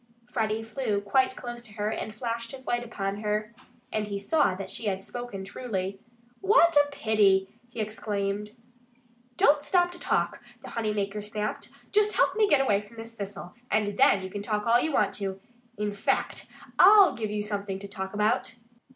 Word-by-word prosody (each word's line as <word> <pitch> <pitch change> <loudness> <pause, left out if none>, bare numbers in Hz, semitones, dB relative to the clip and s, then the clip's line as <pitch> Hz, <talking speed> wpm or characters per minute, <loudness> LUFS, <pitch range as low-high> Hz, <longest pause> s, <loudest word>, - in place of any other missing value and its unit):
Freddie 225 -2 -1
flew 225 -2 -1
quite 260 +6 +2
close 240 -1 -7
to 225 -3 -13
her 210 0 -2
and 220 - -4
flashed 230 +1 -4
his 260 -1 -10
light 240 0 0
upon 200 -4 -3
her. 210 +1 -2 0.4
And 215 -1 -1
he 200 -1 -3
saw 200 - +2
that 190 0 -5
she 230 - -4
had 190 -1 -1
spoken 225 -4 -6
truly. 195 -3 -4 0.4
"What 380 -5 +5
a 290 0 +5
pity!" 210 -7 +2 0.2
he 235 - -9
exclaimed. 210 -1 -2 0.8
"Don't 290 0 +5
stop 355 +2 +2
to 350 - -8
talk!" - - 0 0.2
the - - -9
honey 220 -2 -1
maker 205 0 -2
snapped. 210 0 -4 0.2
"Just 420 0 +3
help - - +3
me 430 -1 +4
to - - -4
get 290 -2 +5
away 205 -7 +2
from 210 +3 -16
this 225 +1 -8
thistle. 200 -4 -7 0.2
And 210 -1 +2
THEN 195 -1 +4
you 190 - -6
can 205 - -4
talk 210 0 -2
all 235 +1 +5
you 315 - 0
want - - +2
to. 195 -1 -3 0.4
In 210 0 -2
fact, 205 - -1 0.3
I'll 400 0 +8
give 220 -2 -3
you 210 0 -2
something 200 -2 -3
to 200 +1 -8
talk 190 0 -6
about." 210 +2 +1
215 Hz, 190 wpm, -27 LUFS, 200-240 Hz, 0.8 s, I'll